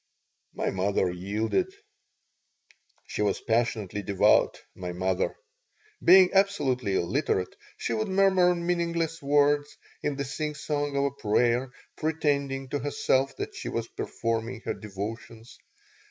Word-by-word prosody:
My - - -1
mother 95 -1 +1
yielded 105 - -1 1.3
She - - -4
was 105 -2 +1
passionately 110 -4 0
devout, 100 -1 +3
my 90 -1 -6
mother. 95 +1 -1 0.7
Being 185 +1 +7
absolutely 140 - +2
illiterate, 95 - 0 0.2
she - - -2
would 110 -1 -1
murmur 190 -2 +4
meaningless 170 -1 -1
words, 145 +1 +2 0.2
in 145 - -1
the 140 0 -3
singsong 145 0 -2
of 140 - +2
a 140 - +1
prayer, 125 0 +1 0.3
pretending 140 -4 -1
to 145 - -1
herself 135 -1 +1
that - - -4
she - - -5
was - - -3
performing 115 +1 -3
her - - -2
devotions. 110 +3 -8
135 Hz, 120 wpm, -27 LUFS, 105-150 Hz, 1.3 s, Being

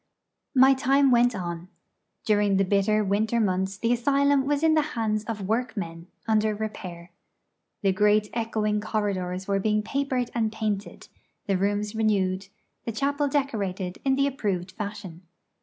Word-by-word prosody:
My 265 +1 +7
time 270 +1 +3
went 240 -1 +4
on. 175 -2 -5 0.6
During 205 -3 +3
the 195 - +3
bitter 205 +2 +2
winter 210 +4 +1
months 190 -2 0
the 230 +4 +1
asylum 280 +2 +2
was 290 +1 0
in 320 -1 +5
the 310 - +4 0.2
hands 215 -2 0
of 215 -4 -4
workmen, 205 -7 -3 0.2
under 215 -1 +2
repair. 180 -5 -6 0.7
The 195 - +4
great 210 +1 +3
echoing 215 -2 -1
corridors 190 -4 -2
were 200 -1 +1
being 210 +1 +1
papered 260 -1 -1
and 225 -2 0
painted, 215 -2 -4 0.4
the 195 - +1
rooms 205 +2 -1
renewed, 195 -4 0 0.4
the 230 - -3
chapel 285 +5 0
decorated 200 -10 -2
in 270 -1 +2
the 275 +1 +2
approved 200 -10 -2
fashion. 200 -4 -7
215 Hz, 145 wpm, -26 LUFS, 195-240 Hz, 0.7 s, My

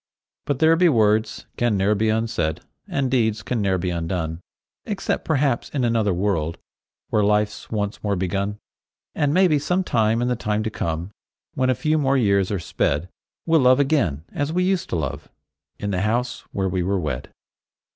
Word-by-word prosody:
But 145 - 0
there 160 +3 +5
be 175 +1 +4
words 110 -4 +2
can 120 -4 +1
ne'er 100 +2 +2
be 110 +1 +1
unsaid, 110 -8 -1 0.3
And 135 -2 -1
deeds 110 -4 +1
can 110 +3 -1
ne'er 95 -2 +1
be 90 0 -2
undone, 80 -1 -3 0.4
Except 205 -3 -2
perhaps 140 -5 0
in 135 -4 -2
another 115 -3 +2
world, 85 -3 -1 0.5
Where 105 - +3
life's 105 0 0
once 105 -1 -3
more 100 -1 +1
begun. 100 +3 -2 0.6
And 145 -1 +1
maybe 170 -3 +4
some 180 +6 0
time 115 -7 +1
in 120 - 0
the 125 - +1
time 105 -2 -1
to 110 - -2
come, 85 +1 -3 0.4
When 130 0 +1
a 130 - +3
few 155 +4 +1
more 135 -1 +2
years 100 -5 +2
are 100 - -1
sped, 80 -1 -1 0.4
We'll 165 -1 +4
love 130 0 +5
again 130 - +1
as 145 +1 -1
we 180 +2 +1
used 185 -1 0
to - - -1
love, 75 -3 -4 0.5
In 100 - -3
the 95 -1 0
house 120 +4 -1
where 95 -1 -1
we 90 0 -1
were 95 +2 0
wed. 75 -7 -4
110 Hz, 185 wpm, -23 LUFS, 95-135 Hz, 0.6 s, there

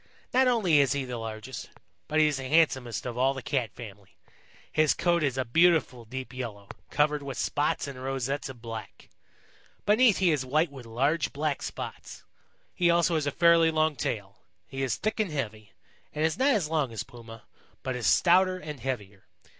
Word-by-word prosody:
Not 260 +1 +4
only 200 -11 +4
is 140 -1 +3
he 140 -2 -2
the 125 -2 -5
largest, 115 +2 -7 0.4
but 155 - +1
he 155 - +6
is 150 -2 +1
the 130 -1 -5
handsomest 130 - +2
of 125 -1 -4
all 135 +2 +2
the 130 - -6
Cat 125 -6 -1
family. 105 -4 -11 0.5
His 155 -1 +3
coat 170 -1 +2
is 135 -4 0
a 130 - 0
beautiful 150 -4 +3
deep 130 +3 -7
yellow, 110 -6 -7 0.2
covered 150 0 +1
with 140 -1 -6
spots 145 0 0
and 130 -2 -8
rosettes 135 +1 -2
of 120 -3 -11
black. 115 -2 -8 0.8
Beneath 215 0 +5
he 185 -3 +3
is 145 -4 0
white 150 +5 +1
with 130 -4 -11
large 140 +8 0
black 145 0 -2
spots. - - -7 0.5
He 175 -1 +2
also 170 0 +3
has 155 -3 0
a - - +1
fairly 170 +1 +5
long 155 -1 +1
tail. 100 -5 -4 0.3
He 135 0 -5
is 130 -3 0
thick 215 +1 -3
and 215 -3 +1
heavy, 110 -8 -5 0.4
and 155 +1 +1
is 160 - +1
not 260 +3 +2
as 185 -8 0
long 150 -5 0
as 110 -1 -4
Puma, 115 -2 -12 0.4
but 130 -1 -2
is 120 -4 -1
stouter 185 - +4
and 150 -5 -7
heavier. 105 -6 -5
140 Hz, 190 wpm, -28 LUFS, 120-160 Hz, 0.8 s, he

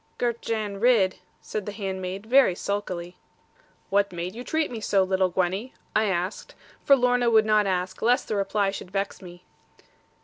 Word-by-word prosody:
'Girt 235 -1 -1
Jan 215 -3 -3
Ridd,' 220 -5 +3 0.2
said 215 -2 -5
the - - -2
handmaid, 190 -1 -5
very 250 -5 +5
sulkily. 180 -3 -4 0.7
'What 200 0 +2
made 175 +1 -5
you 240 +3 -7
treat 315 +2 -1
me 235 - -5
so, 195 -2 +2
little 190 0 +1
Gwenny?' 190 +7 -2 0.2
I 215 - +3
asked, 185 0 -3 0.3
for 275 - +6
Lorna 245 -1 +2
would 220 -1 +5
not 215 -1 +3
ask 185 0 -2
lest 245 +4 +2
the 215 - -2
reply 200 0 0
should 195 - -8
vex 195 +1 -3
me. 175 -1 -12
200 Hz, 170 wpm, -25 LUFS, 185-225 Hz, 0.7 s, for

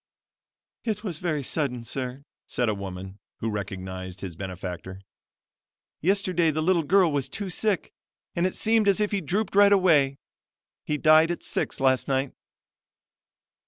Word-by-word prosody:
"It 215 -2 -2
was 175 -7 -4
very 155 -5 -1
sudden, 125 -4 -2
sir," 130 +2 -4 0.2
said 120 -2 0
a - - +1
woman, 95 0 -7 0.2
who 115 - -2
recognized 95 -2 -6
his 90 -4 -6
benefactor. 95 0 -6 1.0
"Yesterday 185 -2 +2
the 155 0 -1
little 175 0 +3
girl 180 +1 +4
was 140 -3 -1
took 200 -3 -4
sick 210 -1 0 0.4
and 175 +2 +2
it 185 - -5
seemed 220 -1 +2
as 200 0 +4
if 210 -1 +1
he 200 -2 0
drooped 205 +2 -1
right 205 0 +7
away. 155 -9 +4 0.7
He 150 - -1
died 155 +2 +6
at 175 - -3
six - - -2
last 130 -1 +2
night." 135 0 0
150 Hz, 150 wpm, -26 LUFS, -, 1.0 s, right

